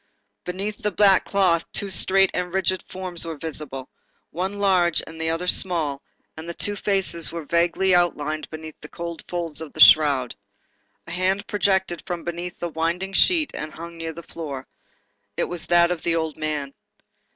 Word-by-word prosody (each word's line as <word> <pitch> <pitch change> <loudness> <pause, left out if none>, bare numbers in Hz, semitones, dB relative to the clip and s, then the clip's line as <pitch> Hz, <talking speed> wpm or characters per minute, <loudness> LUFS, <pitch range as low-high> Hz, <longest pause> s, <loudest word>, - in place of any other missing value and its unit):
Beneath 195 +4 -4
the 210 - +1
black 195 -1 +4
cloth 180 -4 +1
two 200 -1 -1
straight 195 +1 +4
and 180 0 -2
rigid 185 -1 0
forms 185 -2 -3
were 165 -2 -5
visible, 145 -4 -4 0.4
one 185 +4 -2
large, 185 -5 +2
the 160 0 -4
other 165 +2 -1
small, 165 -6 +2 0.3
and 160 +2 -8
the 170 - -5
two 205 - 0
faces 195 -5 0
were 170 -2 -6
vaguely 170 +4 +2
outlined 155 -3 +1
beneath 155 -1 -9
the - - -10
cold 170 -1 -6
folds 165 -4 -4
of 160 - -8
the - - -11
shroud. 140 -6 +6 0.7
A - - -8
hand 190 +3 0
projected 190 -4 +1
from 175 -2 -4
beneath 175 +1 -5
the 175 - -3
winding 170 +4 -2
sheet 320 - +4
and 155 +1 -5
hung 170 +1 -9
near 165 0 -4
the 170 +2 -10
floor. 140 -6 -6 0.7
It - - +1
was 175 -2 -4
that 175 0 +4
of 175 -3 -2
the 170 - 0
old 160 -2 -1
man. 150 -3 -3
170 Hz, 175 wpm, -23 LUFS, 160-185 Hz, 0.7 s, shroud